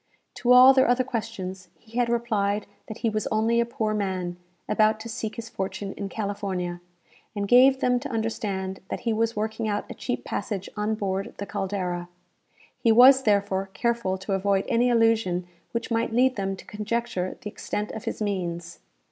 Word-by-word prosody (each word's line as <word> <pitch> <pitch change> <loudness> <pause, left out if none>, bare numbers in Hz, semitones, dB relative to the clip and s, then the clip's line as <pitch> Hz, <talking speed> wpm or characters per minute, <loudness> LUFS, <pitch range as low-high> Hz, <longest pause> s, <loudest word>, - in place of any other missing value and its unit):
To 245 - +1
all 255 +2 +9
their 260 -1 +4
other 245 +1 +3
questions 195 -7 -5
he 230 +7 -6
had 240 -1 +2
replied 215 -4 0 0.2
that 220 - -7
he - - +4
was 215 -1 -1
only 225 +2 +2
a 235 - +2
poor 225 -3 -1
man, 185 -4 -2 0.3
about 215 0 +3
to 230 - -7
seek 220 -1 -4
his 230 -1 -6
fortune 195 -1 -4
in 200 -1 -5
California, 195 -4 -3 0.5
and 200 -1 -2
gave 260 +4 +6
them 250 0 +3
to 270 - -6
understand 205 -4 -2
that - - -4
he 230 - 0
was 230 +1 0
working 220 +1 -2
out 205 -1 -1
a - - -4
cheap - - -4
passage 200 -3 -3
on 210 +1 0
board 195 -2 -3
the 200 - -4
"Caldera." 185 -4 -3 0.7
He 230 - +3
was, 260 +4 +8
therefore, 200 -4 +1
careful 235 -6 0
to 190 +1 -4
avoid 195 0 +1
any 240 +2 +3
allusion 225 -6 +2 0.3
which 230 +1 -3
might 230 0 +1
lead 255 +3 +3
them 195 -1 -2
to - - -13
conjecture 210 -3 -3
the 210 - -7
extent 210 +1 -4
of 220 - -7
his - - -3
means. 175 -4 -3
215 Hz, 180 wpm, -26 LUFS, 195-230 Hz, 0.7 s, all